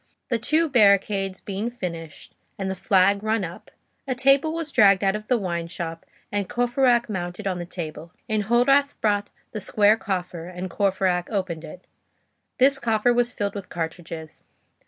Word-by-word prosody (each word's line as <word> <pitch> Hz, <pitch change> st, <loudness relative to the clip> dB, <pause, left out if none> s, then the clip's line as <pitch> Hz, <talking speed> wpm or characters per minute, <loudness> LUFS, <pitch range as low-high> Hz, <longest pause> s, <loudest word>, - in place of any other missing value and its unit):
The 235 Hz, -3 st, +1 dB
two 310 Hz, +8 st, +2 dB
barricades 200 Hz, -5 st, +3 dB
being 205 Hz, +3 st, -3 dB
finished, 170 Hz, -10 st, -7 dB, 0.2 s
and 190 Hz, -1 st, -2 dB
the -, -, -3 dB
flag 195 Hz, +2 st, +3 dB
run 215 Hz, -1 st, 0 dB
up, 175 Hz, 0 st, -8 dB, 0.4 s
a 255 Hz, -, -1 dB
table 275 Hz, +4 st, +4 dB
was 325 Hz, -2 st, -4 dB
dragged 200 Hz, -6 st, +5 dB
out 195 Hz, +1 st, +2 dB
of 215 Hz, 0 st, -6 dB
the 250 Hz, -, +3 dB
wine 170 Hz, -5 st, -3 dB
shop; 165 Hz, -1 st, -6 dB, 0.2 s
and 205 Hz, -2 st, -2 dB
Courfeyrac 245 Hz, 0 st, +2 dB
mounted 180 Hz, -1 st, -5 dB
on 185 Hz, -2 st, -1 dB
the 175 Hz, -, -6 dB
table. 165 Hz, -2 st, -7 dB, 0.2 s
Enjolras 240 Hz, +7 st, +2 dB
brought 205 Hz, -1 st, +1 dB, 0.2 s
the 215 Hz, -, -5 dB
square 210 Hz, +3 st, +3 dB
coffer, 180 Hz, -5 st, -4 dB
and 180 Hz, 0 st, -6 dB
Courfeyrac 185 Hz, -3 st, 0 dB
opened 185 Hz, -6 st, -3 dB
it. 170 Hz, +3 st, -11 dB, 0.7 s
This 275 Hz, +1 st, +4 dB
coffer 225 Hz, +1 st, +2 dB
was 240 Hz, 0 st, +1 dB
filled 205 Hz, -4 st, -2 dB
with 200 Hz, -2 st, -7 dB
cartridges. 160 Hz, -1 st, -6 dB
200 Hz, 160 wpm, -24 LUFS, 180-240 Hz, 0.7 s, dragged